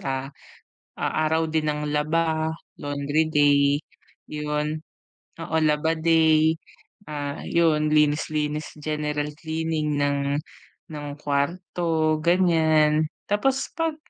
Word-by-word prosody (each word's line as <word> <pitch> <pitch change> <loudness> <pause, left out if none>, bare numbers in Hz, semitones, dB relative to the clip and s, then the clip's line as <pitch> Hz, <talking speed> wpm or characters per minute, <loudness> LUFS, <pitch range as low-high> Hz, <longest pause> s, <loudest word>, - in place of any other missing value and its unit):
ah, 135 +1 -3 0.6
a - - -4 0.2
araw 160 0 +1
din 155 -1 0
ng 150 0 -1
laba, 160 +1 0 0.2
laundry 145 +2 0
day, 145 0 +4 0.5
'yun. 150 +1 -2 0.7
Oo, 160 - -2
laba 155 +1 +2
day, 160 -1 +3 0.5
ah, 145 -1 -4
'yun 155 -3 +2
linis, 150 -1 +2
linis 150 0 -3
general 150 -1 -2
cleaning 160 -2 -2
ng 140 0 0 0.6
ng 150 -1 -6
kwarto 155 +2 0
ganyan. 160 -3 +3 0.2
Tapos 260 +6 0
'pag 325 -2 -1
155 Hz, 100 wpm, -24 LUFS, 150-160 Hz, 0.7 s, day